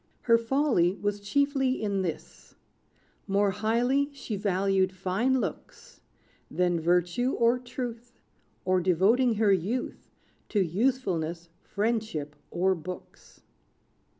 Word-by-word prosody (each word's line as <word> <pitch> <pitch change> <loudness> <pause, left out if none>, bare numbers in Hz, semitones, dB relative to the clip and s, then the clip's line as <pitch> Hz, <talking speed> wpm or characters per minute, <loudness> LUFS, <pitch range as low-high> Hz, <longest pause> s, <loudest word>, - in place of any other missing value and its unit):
Her 230 -1 +4
folly 230 - +2
was 205 0 -1
chiefly 270 +4 +1
in 200 -2 -1
this: 170 -4 -6 0.7
More 200 0 +2
highly 245 +8 +1
she 245 -6 -5
valued 195 -1 +1
fine 195 +8 0
looks, - - -7 0.5
Than 175 -1 +1
virtue 175 +9 +1
or 235 +2 +2
truth, 245 -1 -7 0.5
Or 185 0 +2
devoting 210 +8 +3
her 210 -1 +3
youth 200 +8 -3 0.4
To 210 - +1
usefulness, 175 -4 -1
friendship, 210 -9 -2
or 190 +2 +1
books. 180 +1 -10
205 Hz, 105 wpm, -28 LUFS, 180-245 Hz, 0.7 s, Her